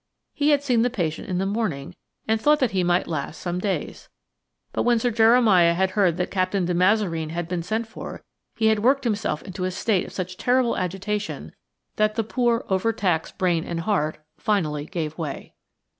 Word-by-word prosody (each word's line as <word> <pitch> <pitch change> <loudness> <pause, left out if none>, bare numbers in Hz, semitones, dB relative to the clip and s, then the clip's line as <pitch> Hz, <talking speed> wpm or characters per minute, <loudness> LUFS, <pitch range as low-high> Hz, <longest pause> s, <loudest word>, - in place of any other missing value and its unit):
He 290 0 +1
had 285 -1 +3
seen 245 -5 +2
the 245 - +2
patient 170 -9 -3
in 180 - -1
the 190 - 0
morning 195 -9 -2 0.3
and 220 0 +1
thought 300 +3 +5
that 260 -5 +1
he 185 -2 +1
might 175 +1 +2
last 155 0 -4
some 175 0 -3
days. 195 0 -3 0.6
But - - 0
when 240 -1 +3
Sir 240 +2 0
Jeremiah 220 -7 +5
had 190 +1 +1
heard 185 -4 +2
that 180 - -2
Captain 185 0 0
de 180 - 0
Mazareen 180 -3 +2
had 170 +1 -3
been 175 0 -2
sent 220 +7 -2
for 225 - -9 0.3
he 220 - 0
had 220 -1 +4
worked 270 +5 +3
himself 205 -10 -1
into 190 0 -6
a 185 - 0
state 190 +1 0
of - - -11
such 185 -1 -5
terrible 250 -1 +2
agitation 200 +3 -3 0.4
that 215 0 +2
the 225 - 0
poor, 235 +1 0
overtaxed 190 -4 0
brain 175 -3 +1
and 170 -1 -4
heart 165 -5 0 0.2
finally 155 -7 0
gave 160 -4 -4
way. 150 -4 -5
190 Hz, 190 wpm, -24 LUFS, 175-225 Hz, 0.6 s, thought